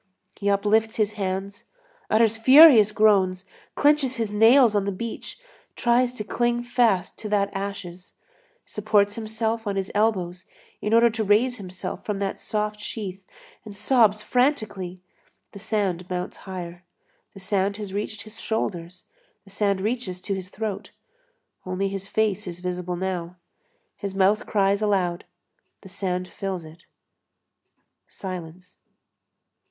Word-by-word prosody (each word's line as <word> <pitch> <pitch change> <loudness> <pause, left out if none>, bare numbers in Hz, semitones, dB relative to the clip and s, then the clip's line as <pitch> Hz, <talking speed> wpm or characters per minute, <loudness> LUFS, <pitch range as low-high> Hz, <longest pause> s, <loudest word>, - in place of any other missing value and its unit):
He 200 - -1
uplifts 215 +2 +2
his 215 -1 0
hands, 195 0 -4 0.4
utters 220 0 +3
furious 255 -2 +8
groans, 195 -4 +3 0.3
clenches 290 -3 +3
his 225 -4 -3
nails 225 +2 +6
on 200 -1 +1
the 200 - -1
beach, 225 +4 -6 0.4
tries 245 +1 +2
to 220 - -5
cling 240 +2 0
fast 235 -7 +1
to 215 - -5
that 200 -1 +1
ashes, 195 -2 -6 0.5
supports 205 -1 +1
himself 220 0 -3
on 200 - -1
his 195 -1 -3
elbows 185 -4 0 0.3
in 210 - -2
order 235 0 +5
to 220 0 -2
raise 225 +5 +2
himself 185 -2 -7
from 210 -2 -3
that 195 -1 -3
soft 210 0 -2
sheath, 200 -3 -6 0.4
and 205 -2 -10
sobs 215 -2 +3
frantically; 215 -9 -1 0.5
the 200 - -10
sand 195 -4 -2
mounts 180 0 -4
higher. 175 -1 -7 0.5
The - - -10
sand 195 +1 -1
has 205 -3 -7
reached 210 +1 -4
his 215 0 -11
shoulders, 180 -5 -3 0.4
the 195 - -17
sand 200 -1 0
reaches 210 -4 -2
to 200 - -3
his 185 -1 -5
throat; 205 -1 -5 0.7
only 185 +2 -2
his 195 0 -5
face 210 -1 0
is 175 -1 -6
visible 180 0 -3
now. 180 -1 -4 0.6
His 200 -1 -5
mouth 195 +2 +2
cries 200 0 +2
aloud, 185 -5 0 0.6
the 190 - -13
sand 185 -1 -3
fills 190 -4 -5
it; 160 +2 -15 1.2
silence. 180 -1 -8
200 Hz, 135 wpm, -24 LUFS, 185-220 Hz, 1.2 s, furious